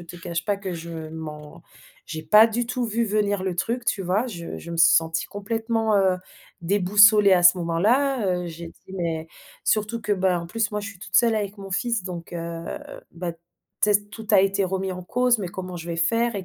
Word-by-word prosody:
te 170 +1 -11
cache 170 0 -4
pas 205 -1 +1
que 195 -2 -5
je 170 0 -7 0.2
m'en 155 0 -9 0.4
j'ai 155 0 -6
pas 210 +6 +7
du 235 +2 -2
tout 250 0 -2
vu 230 +1 0
venir 205 -2 0
le 185 -2 -1
truc, 235 +7 -2
tu 220 - 0
vois? 190 +7 0
Je 170 -7 -7
je 170 - -9
me 170 - -4
suis 165 0 +6
sentie 165 0 +1
complètement, 225 +2 -1
heu, 190 -1 +3 0.5
déboussolée 200 +2 +5
à 175 - +2
ce 180 +1 +7
moment-là, 215 +9 +1 0.2
heu, - - -5
j'ai 170 0 -8
dit: 190 - -16
«Mais» 165 -2 -3 0.4
surtout 215 +2 0
que 210 -1 -1
bah, 185 -2 +1
en 170 - -7
plus 220 +4 -1
moi 210 - -2
je 205 - -6
suis 200 -2 -12
toute - - -12
seule 230 -2 +5
avec 205 -1 -3
mon 195 -1 -9
fils 230 +1 -1
donc 175 -2 -7
heu, 170 0 -5 0.5
bah, 170 0 -4 0.5
tu 210 - +5
sais 205 0 +2
tout 220 +1 -10
a 200 -3 +6
été 195 0 +1
remis 190 0 -2
en 180 - -7
cause: 250 +5 +2
«Mais 190 -4 -4
comment 185 0 -7
je 165 - -8
vais 165 - -3
faire 230 +8 +1
et 190 - -5
195 Hz, 225 wpm, -24 LUFS, 170-215 Hz, 0.5 s, pas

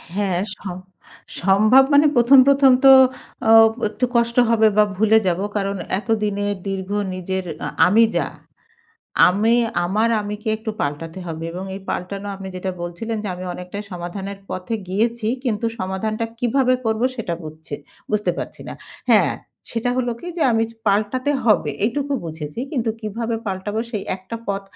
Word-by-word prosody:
হ্যাঁ, 195 -3 0
স - - -9 0.9
সম্ভব 215 +8 +5
মানে 285 +2 +6
১ম, 245 +3 +7
১ম 275 -1 +6
তো 270 - +10 0.6
আ - - +7 0.4
একটু 250 +4 -1
কষ্ট 235 0 +2
হবে 220 -1 +4
বা, 210 - +7
ভুলে 220 +2 +4
যাব। 175 0 +1 0.2
কারণ 200 0 -1 0.2
এতদিনে 210 -2 -1 0.2
দীর্ঘ 190 -1 -4 0.2
নিজের 185 0 -3 0.2
আ - - -2 0.2
আমি 215 +5 +5
যা, - - +1 1.0
আমি 210 +6 +2 0.3
আমার 210 +6 +1
আমিকে 210 +1 -5
একটু 220 0 -5
পাল্টাতে 160 +4 -3
হবে 165 -1 -5
এবং 180 +2 -5
এই 195 - -7
পাল্টানো 195 +3 -4
আপনি 195 0 -8
যেটা 190 +1 -3
বলছিলেন 195 +7 -4
যে - - -2
আমি 180 +1 -7
অনেকটাই 180 +3 -7
সমাধানের 190 +3 -6
পথে 185 +5 -4
গিয়েছি। 225 +4 0 0.2
কিন্তু 230 -2 -1
সমাধানটা 215 +4 -2
কীভাবে 255 +1 +2
করবো 220 +1 0
সেটা 205 -8 -3
বুঝছি 155 -1 -8 0.4
বুঝতে 210 -3 +1
পারছি - - -6
না। - - -5 0.4
হ্যাঁ? - - +4 0.4
সেটা 235 +1 -1
হল 255 -1 0
কি? - - -9
যে 330 - 0
আমি 225 0 +2
চ - - -15
পাল্টাতে 215 +7 +1
হবে 210 -10 +3
এইটুকু 280 +5 -1
বুঝেছি। 160 +3 -6
কিন্তু 240 -6 0
কীভাবে 230 +2 -3
পাল্টাবো 200 +3 -3
সেই 210 -4 -4
একটা 190 +5 -8
পথ 200 0 -1
210 Hz, 160 wpm, -21 LUFS, 185-230 Hz, 1.0 s, তো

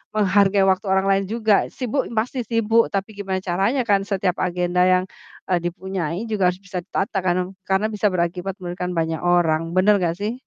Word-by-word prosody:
menghargai 200 -1 +3
waktu 190 +2 -2
orang 190 0 +2
lain 195 0 +2
juga. 220 -2 +2 0.2
Sibuk, 255 0 -1
pasti 245 +4 -1
sibuk, 230 0 +3
tapi 195 +1 -1
gimana 195 -2 -2
caranya 195 +9 +1
kan 200 -1 +4
setiap 190 -2 +1
agenda 180 0 0
yang, 185 0 +3 0.5
eee, 180 -1 +2
dipunyai 180 +1 -3
juga 195 -4 +2
harus 180 - -4
bisa 185 -2 -4
ditata 195 +3 -3
karno 180 +1 0 0.2
karena 190 +2 +2
bisa 210 0 +1
berakibat 180 +1 -2
memberikan 180 -1 -5
banyak 160 -1 -1
orang. 175 -3 +2 0.2
Bener 200 +3 +5
nggak 170 -1 0
sih? 210 +3 -2
190 Hz, 180 wpm, -22 LUFS, 180-205 Hz, 0.5 s, Bener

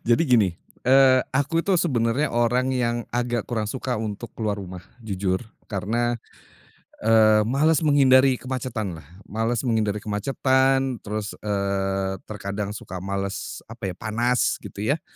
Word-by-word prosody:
jadi 120 +6 +4
gini, 105 - +3 0.2
eee, 130 0 +6
aku 145 +5 +1
itu 200 - -2
sebenarnya 130 -3 +1
orang 125 +2 +2
yang 120 -2 -1
agak 120 -2 -1
kurang 110 -3 -2
suka 130 0 -3
untuk 110 0 -5
keluar 105 -2 -2
rumah, 90 -2 -8 0.2
jujur, 95 -4 -1 0.3
karena, 115 +4 -1 0.8
eee, 110 -1 +5
males 140 +8 +2
menghindari 135 -3 +5
kemacetan 120 -10 -4
lah, 70 - -20 0.2
males 115 +4 -1
menghindari 110 -3 +1
kemacetan, 130 +4 +1
terus, 105 0 -4
eee, 95 -2 -1
terkadang 100 -1 -4
suka 95 -3 -7
malas, 100 0 -4
apa 115 -3 -6
ya, 90 - -6
panas, 120 +3 0
gitu 100 - -6
ya, 145 +7 +1
115 Hz, 135 wpm, -24 LUFS, 100-130 Hz, 0.8 s, eee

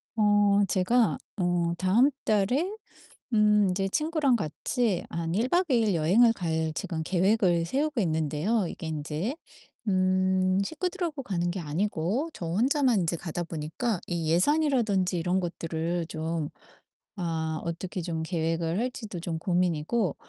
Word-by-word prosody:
어 205 -1 +4
제가 210 +6 +2 0.2
어 175 -2 +1
다음 210 +10 +4 0.2
달에 220 - +2 0.6
음 210 -2 +4
인제 195 +1 0
친구랑 305 - +1
같이 205 - -1
한 165 -1 -3
1 225 +7 +1
박 355 +4 +3
2 255 - +4
일 215 -3 +2
여행을 205 +9 +4
갈 160 -5 -1
지금 160 0 -3
계획을 185 -1 +2
세우고 285 - 0
있는데요 160 +5 0
이게 165 - -7
인제 155 - -3 0.5
음 185 0 +2
식구들하고 330 - -3
가는 175 -6 -1
게 190 - -4
아니고 180 - -1
저 170 - -6
혼자만 245 - +2
인제 170 0 0
가다 175 +1 -4
보니까 170 +7 -3
이 170 -3 -2
예산이라든지 210 - +2
이런 180 +3 +1
것들을 170 -1 -3
좀 160 -1 -3 0.7
아 160 -3 -2
어떻게 175 +3 -4
좀 165 -1 -3
계획을 165 +1 -1
할지도 225 -6 -4
좀 165 -1 -3
고민이고 175 +2 0
185 Hz, 270 characters per minute, -27 LUFS, 165-225 Hz, 0.7 s, 어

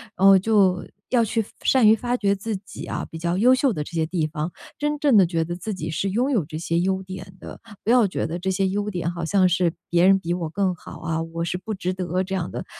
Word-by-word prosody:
然 195 - +4
后 195 -1 +8
就 190 -3 +2 0.2
要 240 -2 +3
去 225 0 0 0.2
善 255 -5 +4
于 220 - +7
发 245 +2 -2
掘 200 -3 +1
自 215 +2 -4
己 190 0 -10
啊， - - -4
比 160 - -8
较 170 +2 -1
优 250 +5 +5
秀 265 -1 +2
的 150 - -3
这 - - -11
些 165 -2 0
地 160 -2 -1
方， 155 +2 -4 0.3
真 295 0 -1
正 285 -5 +3
地 195 - +7
觉 165 -1 0
得 175 +1 -4
自 205 +4 -5
己 165 -3 -5
是 195 +5 -1
拥 245 +6 +1
有 200 - +1
这 155 +1 -7
些 170 0 -1
优 190 +1 0
点 185 0 -9
的， - - -10 0.2
不 - - -3
要 240 -2 +5
觉 190 - -2
得 165 +2 -4
这 190 +2 -2
些 190 +1 +1
优 205 +2 -2
点 175 -3 -2
好 170 -1 -5
像 185 +2 +3
是 175 -1 +1 0.2
别 175 +1 +4
人 195 0 +6
比 170 -1 -2
我 170 -3 -3
更 185 +1 0
好 - - -11
啊， 160 0 -2
我 165 0 -5
是 180 - -2
不 215 +4 -5
值 185 -1 -2
得 180 0 -2
这 190 +1 -3
样 175 -2 -3
的。 - - -5
185 Hz, 290 characters per minute, -23 LUFS, 170-205 Hz, 0.3 s, 后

